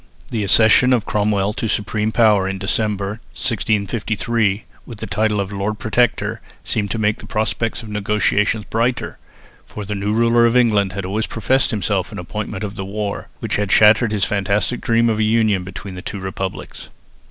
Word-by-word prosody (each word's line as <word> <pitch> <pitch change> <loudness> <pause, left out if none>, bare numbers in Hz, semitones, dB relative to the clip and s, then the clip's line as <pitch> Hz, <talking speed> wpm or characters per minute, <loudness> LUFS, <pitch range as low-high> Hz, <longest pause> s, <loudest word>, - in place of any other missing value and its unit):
The 110 -3 -1
accession 110 +5 +5
of 115 -4 +1
Cromwell 105 -1 0
to 115 - -3
supreme 105 +1 -1
power 105 -4 +3
in 95 - -3
December, 100 +1 -1
1653, 110 -1 -1 0.2
with 115 - -10
the 110 - -4
title 105 +1 0
of 100 0 -2
Lord 100 +2 -2
Protector 120 0 0 0.2
seemed 105 -2 -1
to 105 - -2
make 105 -1 0
the - - -10
prospects 110 +1 -2
of 110 - -9
the - - -7
negotiations 105 +1 +1
brighter, 120 +2 -1 0.4
for 105 - -8
the 105 - -4
new 100 +1 -2
ruler 115 +1 +4
of 115 +2 +2
England 105 -6 +3
had 95 -1 -4
always 105 +4 -2
professed 130 +4 +1
himself 110 -5 -1
an - - -7
opponent - - -5
of 100 -1 -4
the 95 - -4
war, 100 +1 -4
which - - -1
had 105 -1 -1
shattered 110 +3 +5
his 100 -3 +1
fantastic 100 +3 0
dream 115 0 +2
of 110 -2 0
a - - +3
union 110 -3 +2
between 100 +1 -8
the 90 - -7
two 100 - -6
republics. 95 0 -6
105 Hz, 185 wpm, -19 LUFS, 100-115 Hz, 0.4 s, accession